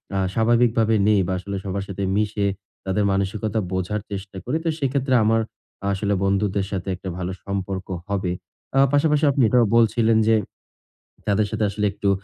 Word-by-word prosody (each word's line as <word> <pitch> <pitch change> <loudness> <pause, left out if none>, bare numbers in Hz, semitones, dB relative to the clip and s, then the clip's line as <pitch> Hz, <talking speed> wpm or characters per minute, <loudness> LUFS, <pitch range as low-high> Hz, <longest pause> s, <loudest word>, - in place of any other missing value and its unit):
আ - - +1 0.2
স্বাভাবিকভাবে 115 0 +3
নেই 105 -1 +4
বা 95 - -1
আসলে 100 +2 -5
সবার 100 0 -3
সাথে 100 0 -4
মিশে 105 0 0 0.4
তাদের 95 +2 0
মানসিকতা 100 +2 -1
বোঝার 95 +3 -2
চেষ্টা 95 -1 -6
করি, 135 +6 0
তো - - +2
সেক্ষেত্রে 135 -1 0
আমার 115 +1 +3 0.5
আসলে 100 +1 0
বন্ধুদের 100 0 +1
সাথে 95 -2 -3
একটা 95 +1 -7
ভালো 90 0 -3
সম্পর্ক 95 -1 -3 0.2
হবে। 95 -3 -1 0.5
আ - - +6
পাশাপাশি 150 +1 +3
আপনি 135 - +1
এটাও 125 -2 +4
বলছিলেন 115 0 +4
যে, 115 - +5 0.9
তাদের 105 +1 +2
সাথে - - -1
আসলে 105 +1 -1
একটু 100 0 -1
105 Hz, 160 wpm, -23 LUFS, 95-115 Hz, 0.9 s, আ